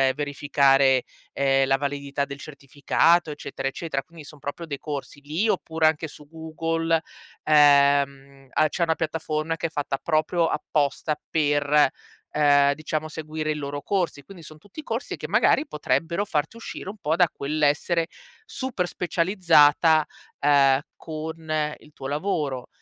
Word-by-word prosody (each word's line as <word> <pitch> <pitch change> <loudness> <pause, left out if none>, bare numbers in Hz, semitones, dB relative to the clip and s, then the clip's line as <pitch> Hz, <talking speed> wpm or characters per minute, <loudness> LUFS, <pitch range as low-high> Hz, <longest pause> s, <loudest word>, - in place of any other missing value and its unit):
verificare, 140 -2 +3 0.3
ehm, 135 -1 +2
la 135 - +3
validità 140 0 -3
del 140 0 -9
certificato, 155 +4 +1
eccetera, 145 -2 -5
eccetera. 135 0 -3
Quindi, 165 0 -14
son 150 0 -13
proprio 145 +5 -6
dei 140 -3 -6
corsi 145 -1 -6
lì 155 +9 -1
oppure 160 -6 0
anche 155 0 +2
su 150 -1 -14
Google, 165 +1 -1 0.4
ehm, 140 -2 +4 0.2
a 155 - +3
c'è 170 - -1
una 160 -1 +1
piattaforma 160 0 -2
che 165 - -2
è - - -11
fatta 145 -3 -3
proprio 165 +3 +1
apposta 150 0 -1
per, 145 -2 +3 0.4
ehm, 145 -1 +4
diciamo, 155 0 -3
seguire 155 0 -4
i 150 - -2
loro 145 -1 -5
corsi. 180 -7 -2
Quindi 180 +4 -13
son 155 0 -12
tutti 205 - -11
corsi 230 +2 -4
che - - -6
magari 310 - +3
potrebbero 160 - -1
farti 155 0 -2
uscire 230 -4 -8
un 210 - -8
po' 160 -4 0
da 180 -2 +5
quell'essere 155 +3 0 0.4
super 260 - -3
specializzata, 165 -4 +3 0.3
ehm, 140 -2 +4 0.2
con 155 -1 -4
il 150 - -19
tuo 135 - -7
lavoro 145 -4 -2
150 Hz, 145 wpm, -24 LUFS, 140-165 Hz, 0.4 s, da